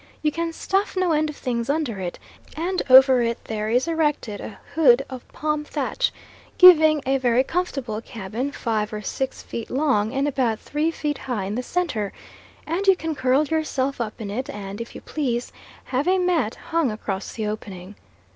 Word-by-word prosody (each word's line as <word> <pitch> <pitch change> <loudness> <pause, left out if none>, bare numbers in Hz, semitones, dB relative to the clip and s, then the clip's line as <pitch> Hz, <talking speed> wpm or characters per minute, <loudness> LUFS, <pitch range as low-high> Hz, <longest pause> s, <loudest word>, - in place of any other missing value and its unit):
You 305 - +2
can 335 +1 -2
stuff 390 +4 -1
no 370 -2 +2
end 310 0 +2
of 300 - -6
things 235 -3 -3
under 285 -9 -1
it; 180 -2 -4 0.4
and 360 +3 -1
over 260 -1 +8
it 235 0 0
there 215 -1 -3
is 250 +6 +2
erected 295 -10 -1
a 215 - -8 0.2
hood 275 -4 +5
of 255 -2 -8
palm 300 0 -2
thatch, - - -1 0.5
giving 315 -5 +8
a 270 +1 +2
very 250 0 +3
comfortable 270 -10 -2
cabin 230 +4 -5
five 220 -6 -2
or 210 0 -5
six 265 +6 -3
feet 230 - -6
long 255 -6 +1
and 275 +2 0
about 255 -6 0
three 300 +2 -1
feet 300 -3 -3
high 240 -7 -3
in 200 - -3
the 245 - -1
centre, 255 - -2 0.5
and 355 +5 -2
you 385 - +7
can 325 -2 -3
curl 260 +2 +2
yourself 280 -4 -1
up 215 -2 -4
in 205 -3 -5
it 255 +5 -3
and, 200 +1 -6
if 230 - -8
you - - -8
please, 250 -5 -2 0.3
have 270 +5 -1
a 375 +1 +4
mat 340 -11 +1 0.2
hung 330 -5 +2
across 205 -3 -4
the 220 - -3
opening. 200 -3 -6
265 Hz, 185 wpm, -23 LUFS, 225-310 Hz, 0.5 s, over